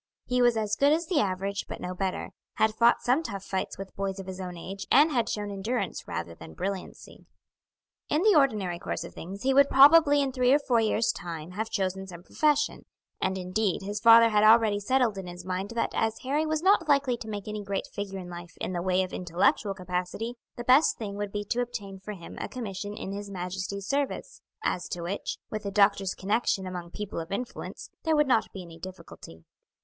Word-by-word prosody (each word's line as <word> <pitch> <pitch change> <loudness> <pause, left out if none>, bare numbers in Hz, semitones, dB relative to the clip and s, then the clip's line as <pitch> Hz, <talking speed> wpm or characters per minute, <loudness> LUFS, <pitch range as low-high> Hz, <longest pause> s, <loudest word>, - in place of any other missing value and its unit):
He 250 0 +1
was 240 -2 +4
as 210 -1 0
good 280 +6 +4
as 330 +3 +2
the 335 -2 +1
average, 195 0 -1
but - - -6
no 180 - -4
better; 185 0 -3 0.2
had 220 0 +2
fought 235 +2 +4
some 255 +6 +3
tough 200 -10 -6
fights 190 -1 -3
with 195 0 -8
boys 195 -1 -2
of 190 - -6
his 190 0 -6
own 180 -1 -6
age, 195 +3 -7
and 295 +4 +6
had 240 -5 +1
shown 205 -1 -3
endurance 210 +6 -3
rather 85 0 -4
than 80 -1 -12
brilliancy. 195 -1 -6 0.8
In 310 +4 +2
the 430 -1 +6
ordinary 210 - +2
course - - -4
of - - -9
things 195 +6 -8
he 270 +1 +3
would 280 +1 +6
probably 290 +1 +7
in 275 -2 +1
three 255 -1 +2
or - - +7
four 255 -5 +1
years' 220 +1 +2
time 170 -3 -7
have 220 +4 -3
chosen 190 -1 -2
some 175 -2 -10
profession; 295 +6 +1 0.4
and, 190 0 0
indeed, 185 +2 -1
his 205 +2 -3
father 230 +1 +8
had 210 -1 +3
already 215 -1 +6
settled 230 -1 +1
in 190 - -7
his 175 0 -9
mind 185 +2 -3
that 230 - 0
as 225 0 0
Harry 295 +4 0
was 310 +1 -1
not 380 -3 +4
likely 280 -3 +3
to 220 - -9
make 205 -1 -5
any 210 -1 -4
great 200 0 -2
figure 200 -1 -4
in 185 -2 -7
life 175 -1 -9
in - - -3
the 175 - -2
way 185 +1 +2
of 185 - -7
intellectual 185 +3 +1
capacity, 185 +5 -3 0.2
the 240 - -6
best 260 +5 +5
thing 210 -3 -5
would 205 0 -4
be 205 0 -3
to 240 +4 0
obtain 200 -5 -5
for 210 +3 -7
him 175 -4 -10
a - - -4
commission 205 -4 -5
in 195 - -6
his 205 0 -6
Majesty's 190 +1 -4
service, 280 - -2 0.2
as 180 - -1
to 175 - -4
which, 190 +4 -3
with 215 - -3
the 200 - -4
doctor's 200 -1 +3
connection 200 -1 0
among 180 -2 -6
people 205 0 -5
of 165 +3 -7
influence, 235 +5 -5
there 320 -1 +1
would 300 0 +4
not 235 -4 +2
be 190 - -7
any 165 -1 -12
difficulty. 165 - -11
205 Hz, 215 wpm, -28 LUFS, 185-245 Hz, 0.8 s, father